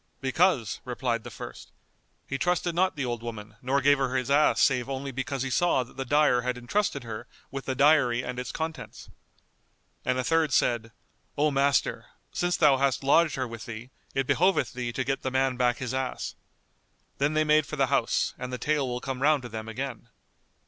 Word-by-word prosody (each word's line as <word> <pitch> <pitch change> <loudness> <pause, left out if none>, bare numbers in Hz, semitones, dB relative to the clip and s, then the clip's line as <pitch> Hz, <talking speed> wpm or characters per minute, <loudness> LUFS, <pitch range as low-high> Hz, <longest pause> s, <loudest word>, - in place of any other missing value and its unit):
"Because," 135 - +1
replied 120 -2 -2
the - - -7
first, - - -9 0.5
"he 135 - -4
trusted 180 -1 0
not 185 +2 +1
the 140 -3 -2
old 120 -2 -3
Woman 110 -2 -8
nor 135 +2 +1
gave 145 0 +4
her 130 -1 0
his 130 +1 -1
ass 150 +2 +4
save 130 -2 +2
only 135 0 -4
because 130 +1 -3
he 135 - -3
saw 175 -3 +2
that 125 - -17
the 135 - -4
dyer 145 -2 +3
had 125 0 -2
entrusted 140 +2 -1
her 115 +1 -7 0.2
with 135 0 -5
the 130 - -2
dyery 130 -4 +4
and 125 0 -4
its 125 - -4
contents." 160 0 -6 0.9
And 125 0 0
a 130 - 0
third 160 -1 +2
said, 115 -2 +1 0.5
"O 150 +1 +3
master, 140 0 +1 0.2
since 175 0 0
thou 145 -4 +5
hast 135 0 +1
lodged 155 +2 +4
her 130 -1 -2
with 115 -1 -8
thee, 120 +2 -8 0.2
it 135 0 +1
behoveth 185 +5 +2
thee 120 -1 -3
to 130 - -2
get 135 +1 -2
the 130 - -2
man 130 0 +1
back 125 -1 +2
his 130 -1 -4
ass." 130 -1 -3 0.9
Then 145 +2 +1
they 155 - +4
made 155 -1 +3
for - - -5
the - - +3
house, - - +1
and 125 0 -5
the 125 - -3
tale 145 0 0
will 125 0 -3
come 135 -1 -4
round 145 -1 +3
to 120 - -7
them 110 0 -6
again. 120 -1 -5
130 Hz, 205 wpm, -27 LUFS, 125-145 Hz, 0.9 s, thou